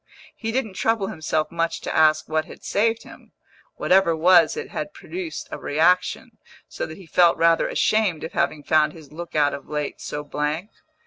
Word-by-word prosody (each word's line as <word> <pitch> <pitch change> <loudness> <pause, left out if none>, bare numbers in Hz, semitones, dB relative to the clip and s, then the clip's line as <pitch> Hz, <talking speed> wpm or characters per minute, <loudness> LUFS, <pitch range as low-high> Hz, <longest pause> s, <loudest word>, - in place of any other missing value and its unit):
He 225 -1 -4
didn't 225 -4 -2
trouble 225 0 0
himself 155 0 -2
much 165 0 -1
to - - -4
ask 155 -1 +4
what 155 0 0
had - - -13
saved 225 +2 0
him; - - -15 0.4
whatever 190 -1 +3
it - - -4
was 175 - +5
it 460 - -5
had - - -5
produced 335 -5 -6
a - - -5
reaction, 170 +5 +1 0.3
so - - -5
that 160 - -10
he 190 - -13
felt 170 +1 +4
rather 165 0 +3
ashamed 210 -7 +1
of 160 - -5
having 150 - -1
found 155 0 +3
his 155 -4 -14
look 170 +2 -8
out 145 -1 +3
of 140 -1 -8
late 150 -1 -4
so 150 - -5
blank. 150 +7 -3
165 Hz, 190 wpm, -23 LUFS, 155-195 Hz, 0.4 s, was